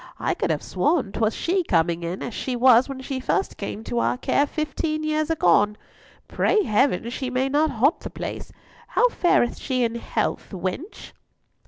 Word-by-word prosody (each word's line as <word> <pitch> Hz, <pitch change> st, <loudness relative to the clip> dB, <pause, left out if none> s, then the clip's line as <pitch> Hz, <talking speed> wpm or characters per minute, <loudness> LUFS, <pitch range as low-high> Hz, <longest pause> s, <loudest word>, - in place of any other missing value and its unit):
I -, -, 0 dB
could -, -, -2 dB
have -, -, -1 dB
sworn 270 Hz, -, 0 dB
'twas 220 Hz, 0 st, 0 dB
she 370 Hz, +2 st, 0 dB
coming 170 Hz, -, +1 dB
in, 170 Hz, +2 st, -4 dB
as 240 Hz, -, -5 dB
she 255 Hz, +3 st, -3 dB
was 250 Hz, +1 st, +5 dB
when 265 Hz, -1 st, -6 dB
she 265 Hz, 0 st, -4 dB
first 390 Hz, +9 st, -1 dB
came 220 Hz, -, -5 dB
to 235 Hz, -, -2 dB
our 245 Hz, -, +1 dB
care 285 Hz, +2 st, +1 dB
fifteen 310 Hz, +1 st, -2 dB
years 310 Hz, 0 st, 0 dB
agone. 210 Hz, -, +3 dB, 0.5 s
Pray 425 Hz, -, +2 dB
Heaven 225 Hz, -, +1 dB
she 260 Hz, 0 st, -3 dB
may 255 Hz, +1 st, 0 dB
not 300 Hz, +3 st, +2 dB
haunt 270 Hz, +5 st, +2 dB
the -, -, -7 dB
place! -, -, -6 dB, 0.4 s
How -, -, +3 dB
fareth 350 Hz, -, +2 dB
she 255 Hz, -3 st, -1 dB
in 230 Hz, -1 st, 0 dB
health, 235 Hz, -, -2 dB
wench?" 190 Hz, -, -5 dB
260 Hz, 180 wpm, -24 LUFS, 220-310 Hz, 0.5 s, was